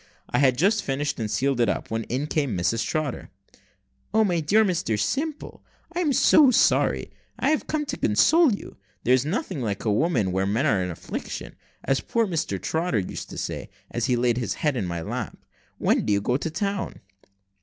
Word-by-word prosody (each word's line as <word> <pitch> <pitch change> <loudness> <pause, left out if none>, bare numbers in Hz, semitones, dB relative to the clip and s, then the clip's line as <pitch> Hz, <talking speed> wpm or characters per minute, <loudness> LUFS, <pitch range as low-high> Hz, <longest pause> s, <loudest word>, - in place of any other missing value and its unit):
I - - +2
had 130 -3 +4
just 200 - +3
finished, 145 +1 -2
and 110 -2 -2
sealed 135 +1 +1
it 120 - +3
up, - - -3
when 115 0 -2
in 130 +5 -2
came 140 - -1
Mrs 110 +6 +1
Trotter. 155 -5 -3 0.9
"O 220 - +5
my 180 -5 +1
dear 205 +8 +3
Mr 170 - 0
Simple! 295 - -3 0.3
I'm 345 -4 +1
so 280 +1 +6
sorry; 250 - +2 0.3
and - - -2
I - - +4
have 310 - 0
come 305 -1 -1
to - - -4
console 315 - +4
you. 200 - -6 0.3
There's 130 +2 +3
nothing 170 - -2
like 105 -3 -3
women 110 - +1
when 95 +2 0
men 125 +7 +1
are 105 -10 +2
in 90 - -2
affliction, 85 - -6 0.3
as 135 - +1
poor 230 -2 0
Trotter 160 - -1
used 95 -3 -4
to - - -8
say, - - -4 0.2
as - - -1
he 125 - +2
laid 120 -1 +1
his 120 - -2
head 150 -3 0
in 100 -7 -2
my 85 -1 -4
lap. - - -4 0.4
When - - +2
do - - -1
you 100 - +3
go 125 +5 0
to 145 - -2
town?" 200 +3 -3
140 Hz, 195 wpm, -25 LUFS, -, 0.9 s, so